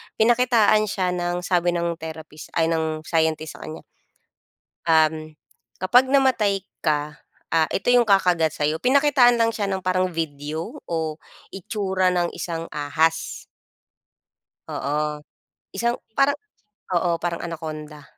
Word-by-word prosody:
Pinakitaan 225 -2 +4
siya 185 -2 -1
ng 175 0 -2
sabi 175 -1 +1
ng 170 -1 -2
therapist 160 -1 -9
ay 165 0 +2
ng 160 -1 -1
scientist 160 -2 -1
sa - - -13
kanya 155 - -8 1.0
um, 155 -1 +2 0.5
kapag 245 +8 +5
namatay 255 -8 +2 0.2
ka, 150 0 0 0.3
ah, 165 -1 +3
ito 195 - 0
yung 245 -1 +5
kakagat 180 -6 +3
sa'yo. 150 +1 0
Pinakitaan 260 - +4
lang 230 0 +3
siya 215 -2 -2
ng 190 -1 -2
parang 185 0 +1
video 160 - -4
o 160 -2 -3 0.3
itsura 190 -2 -1
ng 175 -1 +1
isang 165 -1 -5
ahas. 160 +2 -1 1.3
Oo. 150 +1 -2 0.5
Isang 235 +4 0 0.2
parang 285 +1 +2 0.5
oo, 170 -1 +2
parang 170 0 -3
Anaconda. 155 -3 -7
170 Hz, 120 wpm, -23 LUFS, 160-205 Hz, 1.3 s, kapag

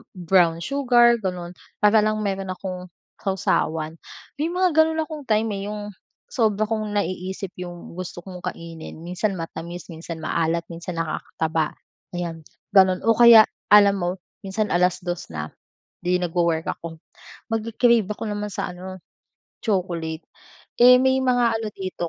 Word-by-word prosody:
brown 175 -2 +3
sugar 240 +1 +4
gano'n 180 -2 -4 0.3
para 210 +1 +6
lang 215 0 +1
mayro'n 195 -2 -2
akong 185 -1 -7 0.3
sawsawan. 160 -5 0 0.5
May 325 - +1
mga 365 -1 +2
gano'n 320 0 +4
akong 305 -1 -8
time, 220 +1 +2
eh, 195 - -5
yung 210 0 -6 0.4
sobra 215 -3 +1
kong 215 -2 -2
naiisip 190 0 -3
yung 175 -1 -8
gusto 185 -1 -6
kong 180 -2 -9
kainin 165 -1 -7
minsan 185 +3 -2
matamis, 170 +1 -7
minsan 165 0 -7
maalat, 165 +1 0
minsan 170 +1 -6
nakakataba, 160 0 -2 0.4
ayan 165 -2 -4 0.3
gano'n. 185 -1 +5
O 230 - +5
kaya 235 -2 +9 0.2
alam 205 -1 +7
mo 175 0 0 0.4
minsan 210 +2 -1
2:00 180 0 0
na, 75 0 -5 0.5
'di 180 +1 +2
nag-wo-work 170 -2 0
ako 165 -1 -9 0.5
mag-cra-crave 230 -1 +2
ako - - -10
naman 210 0 -3
sa - - -3
ano, 185 +1 -8 0.7
chocolate, 175 -6 -2 0.6
eh, 250 +1 +9
may 260 0 +3
mga 245 -3 +3
ano 220 - -4
dito 185 -2 -4
185 Hz, 140 wpm, -23 LUFS, 170-215 Hz, 0.7 s, kaya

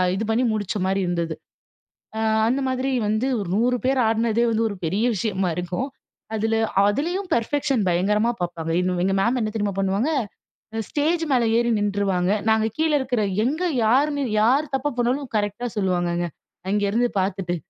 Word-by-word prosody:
இது 215 - -2
பண்ணி 240 +3 +2
முடிச்ச 205 -2 -2
மாரி 195 +1 +1
இருந்தது. 170 -2 -2 0.8
அ - - -1 0.3
அந்த 255 +4 +1
மாதிரி 260 +1 -1 0.2
வந்து, 215 +5 0
ஒரு 200 - -4
100 245 +4 +2
பேர் 265 0 +2
ஆடுனதே 225 +1 +1
வந்து 225 +1 +1
ஒரு 200 - -5
பெரிய 195 +8 0
விஷயமா 190 -3 -1
இருக்கும். 180 +9 -2 0.5
அதில 225 +1 0 0.3
அதிலேயும் 345 - -1
பெர்ஃபெக்ஷன் 275 +1 0
பயங்கரமா 210 +6 +2
பார்ப்பாங்க. 170 -2 -3
எங்க 180 0 0
எங்க 195 - +1
மேம் 240 +4 +1
என்ன 215 -1 -1
தெரியுமா 205 -2 -1
பண்ணுவாங்க? 195 +9 +1 0.7
அ 225 - -1
ஸ்டேஜ் 320 +3 0
மேல 245 -3 +3 0.2
ஏறி 240 0 +1
நின்றுவாங்க. 200 -2 0 0.2
நாங்க 220 0 +3
கீழ 315 0 +2
இருக்கிற 250 -4 -1 0.2
எங்க 310 +7 -1 0.2
யார்ன்னு 285 +5 +2 0.2
யார் 275 +6 +2
தப்பு 280 +2 -1
பண்ணாலும், 250 +2 0
கரெக்ட்டா 205 +4 -2
சொல்லுவாங்கங்க, 175 -3 0 0.4
அங்கே 205 -1 +1
இருந்து 240 +3 +2
பார்த்துட்டு. 185 -2 -2
220 Hz, 160 wpm, -23 LUFS, 195-255 Hz, 0.8 s, மேல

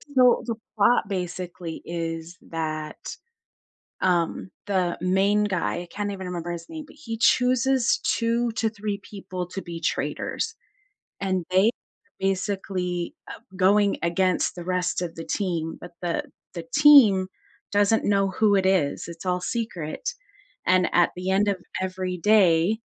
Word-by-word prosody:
So 250 -1 +5
the 230 -2 -2 0.2
plot, 215 0 +3
basically, 180 -3 -5
is 165 0 -4
that, 155 -1 -4 1.0
um, 180 0 0 0.2
the 185 -3 0
main 195 +3 +2
guy 190 -3 -1
I 175 - -12
can't 205 0 -3
even 190 -2 -6
remember 175 -1 -4
his 170 -1 -6
name, 315 -2 -7
but - - -17
he 230 -7 -5
chooses 255 +1 +3
2 235 +1 +1
to 225 0 0
3 210 -1 -4
people 185 -3 -6
to 195 +1 -6
be 170 -1 -7
traitors. 450 0 -2 0.7
And 185 -3 -1
they, 190 +4 +5 0.5
basically, 190 -2 -2
uh, - - -8 0.2
going 200 +2 +3
against 180 +2 +1
the 175 -1 -7
rest 180 -1 0
of 170 -2 -4
the 165 - -7
team, 170 -5 -2
but 175 - -10
the 175 -1 -1 0.3
the 170 -2 -6
team 260 -11 +7 0.4
doesn't 205 +2 +3
know 195 -1 +2
who 205 +1 +3
it 190 -1 +2
is, 185 -7 +1
it's 170 +1 -9
all 180 0 0
secret, 220 - -3 0.6
and 185 0 +3
at 175 -1 +4
the 185 +1 -4
end 200 +2 +3
of 200 -2 +1 0.2
every 185 -1 -3
day, 190 +1 +4
190 Hz, 145 wpm, -25 LUFS, 175-210 Hz, 1.0 s, team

